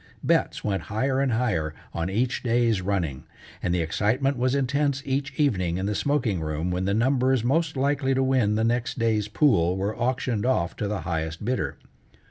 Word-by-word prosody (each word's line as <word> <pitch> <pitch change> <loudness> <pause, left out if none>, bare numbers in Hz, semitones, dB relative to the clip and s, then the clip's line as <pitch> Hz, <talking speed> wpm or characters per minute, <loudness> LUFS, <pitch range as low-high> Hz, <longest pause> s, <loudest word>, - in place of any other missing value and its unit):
Bets - - +1
went 100 -2 -1
higher 130 +6 0
and 135 -3 +1
higher 90 -11 0 0.2
on 85 +2 -2
each 120 +6 0
day's 115 -4 +2
running, 90 -8 -2 0.4
and 90 - -1
the 90 -1 +1
excitement 120 - +1
was 125 +2 +1
intense 140 +1 0
each 135 +1 -1
evening 90 - +1
in 95 - -2
the 105 - 0
smoking 120 - 0
room 80 +3 -2
when 90 +1 -1
the 100 - +1
numbers 130 +1 +2
most 145 +4 +1
likely 135 0 +1
to 135 - +2
win 130 -6 +2
the 110 - +1
next 120 +1 0
day's 110 -3 +1
pool 100 - +2
were 100 +3 -2
auctioned 120 -2 -1
off 95 -9 0
to 105 - -2
the 100 -3 -2
highest 80 +2 -3
bidder. 125 +2 -1
115 Hz, 185 wpm, -25 LUFS, 95-130 Hz, 0.4 s, day's